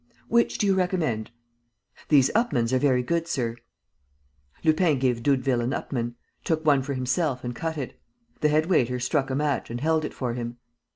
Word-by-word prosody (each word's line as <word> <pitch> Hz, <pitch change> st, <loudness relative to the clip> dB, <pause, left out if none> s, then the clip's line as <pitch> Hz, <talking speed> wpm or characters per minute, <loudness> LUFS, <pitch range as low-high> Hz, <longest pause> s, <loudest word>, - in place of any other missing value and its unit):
"Which 235 Hz, 0 st, +2 dB
do -, -, +1 dB
you 195 Hz, -, +4 dB
recommend?" 180 Hz, -, 0 dB, 0.8 s
"These 135 Hz, -3 st, +5 dB
Upmanns 130 Hz, -, +1 dB
are 130 Hz, -, +3 dB
very 125 Hz, -2 st, +2 dB
good, 170 Hz, +4 st, -1 dB
sir." 120 Hz, -7 st, -1 dB, 1.1 s
Lupin 155 Hz, -1 st, +3 dB
gave 125 Hz, -2 st, 0 dB
Doudeville 130 Hz, -2 st, +2 dB
an 120 Hz, +3 st, -1 dB
Upmann, 120 Hz, -2 st, -3 dB, 0.3 s
took 160 Hz, -1 st, -1 dB
one 145 Hz, -3 st, +5 dB
for 140 Hz, +1 st, -3 dB
himself 130 Hz, +1 st, -1 dB
and 120 Hz, 0 st, -3 dB
cut 160 Hz, +3 st, -3 dB
it. 135 Hz, -4 st, -6 dB, 0.4 s
The 150 Hz, -, +3 dB
head 155 Hz, +1 st, +3 dB
waiter 125 Hz, -8 st, +2 dB
struck 135 Hz, +2 st, 0 dB
a 130 Hz, -, -1 dB
match 145 Hz, -1 st, -1 dB
and 120 Hz, +1 st, -4 dB
held 160 Hz, +2 st, +1 dB
if -, -, -3 dB
for 125 Hz, -3 st, -3 dB
him. 120 Hz, 0 st, -5 dB
135 Hz, 180 wpm, -26 LUFS, 125-160 Hz, 1.1 s, These